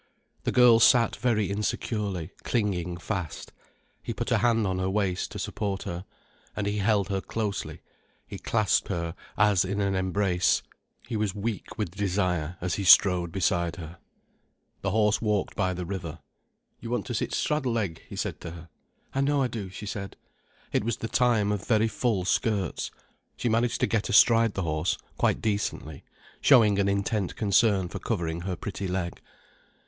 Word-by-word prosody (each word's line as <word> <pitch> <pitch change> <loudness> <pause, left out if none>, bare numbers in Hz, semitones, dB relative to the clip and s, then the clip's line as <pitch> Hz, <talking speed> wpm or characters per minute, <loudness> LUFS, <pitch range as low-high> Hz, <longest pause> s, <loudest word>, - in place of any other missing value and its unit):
The - - +1
girl 120 -2 +6
sat 115 0 +5
very 110 -5 +1
insecurely, 100 -3 -2
clinging 90 -6 -1
fast. 85 -1 -5 0.5
He - - -5
put - - -3
a - - +4
hand 115 -2 +2
on 95 -1 -1
her 95 0 0
waist, 95 -2 -1
to - - -8
support 100 -2 -3
her. 85 +2 -5 0.5
And 105 - -2
he 105 +1 -1
held 100 -2 +2
her 95 -1 -1
closely, 105 -2 -4 0.4
he - - -8
clasped 105 -5 +1
her 85 -4 -3 0.2
as 105 -3 +4
in 100 +2 -2
an 100 -1 +1
embrace, 95 -1 +1 0.4
he 120 - -4
was 105 -3 -1
weak 105 +1 -4
with 105 -6 -2
desire 90 -4 -1
as 90 -1 -1
he - - -2
strode 90 -2 +6
beside 85 -2 0
her. 85 0 -9 0.8
The 95 - -1
horse 105 +1 +2
walked 105 -3 0
by 95 - +1
the 90 -1 -4
river. 85 -3 -5 0.6
"You 115 - -7
want 120 - -1
to 120 - -4
sit 110 - -2
straddle 140 -5 0
leg," 95 -8 -2
he - - -7
said - - -3
to 85 - -6
her. 85 0 -11 0.4
"I 135 - 0
know 140 0 +2
I - - +1
do," 110 -5 -5
she 95 +3 -8
said. 100 -1 -5 0.6
It - - +2
was 115 0 -1
the 115 - -4
time 115 -5 +2
of 100 -3 -3
very 110 -1 +3
full 110 -5 -1
skirts. 100 -1 0 0.5
She 120 - -1
managed 115 +1 +1
to - - +5
get 110 -3 -1
astride 115 0 +5
the 95 - -1
horse, 80 +1 0 0.2
quite - - +2
decently, 100 -8 -2 0.4
showing 110 -7 +5
an 100 0 +2
intent 100 0 -1
concern 100 -2 +3
for 100 - -6
covering 85 -6 -2
her 90 0 -3
pretty 100 +1 -5
leg. 90 -1 -3
100 Hz, 175 wpm, -27 LUFS, 90-110 Hz, 0.8 s, girl